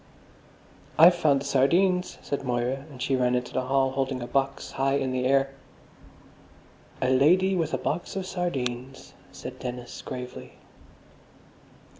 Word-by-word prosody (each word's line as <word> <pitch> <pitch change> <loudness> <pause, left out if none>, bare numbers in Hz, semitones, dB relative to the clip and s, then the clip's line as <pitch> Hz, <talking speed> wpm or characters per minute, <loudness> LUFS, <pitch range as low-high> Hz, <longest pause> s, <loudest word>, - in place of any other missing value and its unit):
"I've 170 +3 +9
found 150 -5 +2
the - - -7
sardines," 180 +7 +2
said 140 - -3
Moira, 125 +2 -1
and 135 -4 -12
she 135 +2 0
ran 125 -1 +2
into 125 0 -3
the 130 -1 -1
hall, 135 0 +2
holding 135 -1 -2
a - - -4
box 135 +2 -1
high 135 +1 +1
in 135 -2 0
the 125 0 -1
air. 135 0 +2 1.5
"A 130 - +2
Lady 180 +9 +4
with 165 -3 -1
a - - -1
Box 175 - -3
of 190 -1 -3
Sardines," 135 -8 -4 0.2
said - - -9
Dennis 125 -1 -6
gravely. 125 0 -8
135 Hz, 145 wpm, -26 LUFS, 125-155 Hz, 1.5 s, I've